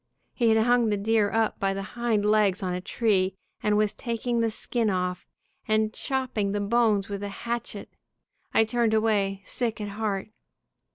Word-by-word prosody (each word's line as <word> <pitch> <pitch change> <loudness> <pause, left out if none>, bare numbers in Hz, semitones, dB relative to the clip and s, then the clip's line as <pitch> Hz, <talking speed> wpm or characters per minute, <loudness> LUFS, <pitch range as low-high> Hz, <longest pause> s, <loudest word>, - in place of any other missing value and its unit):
He 235 -3 +2
had 220 0 +4
hung 240 -2 +3
the 205 - +1
deer 210 0 +2
up 225 -1 0
by 195 0 0
the 195 - -3
hind 235 -4 0
legs 210 -2 +3
on 180 -1 -1
a 180 - -3
tree, 190 -3 +1 0.3
and 210 0 +2
was 210 -1 +2
taking 235 0 -2
the 230 0 +2
skin 225 +1 -1
off, 180 -1 -2 0.4
and 215 0 +1
chop 265 -2 -2
ping 200 -2 0
the 205 - 0
bones 210 -1 +2
with 200 -1 -5
a 205 - -4
hatchet. 235 -1 -5 0.6
I - - +4
turned 225 0 +1
away, 200 -3 +1
sick 235 -2 -2
at 210 -1 -4
heart. 205 -1 -3
215 Hz, 180 wpm, -26 LUFS, 200-230 Hz, 0.6 s, had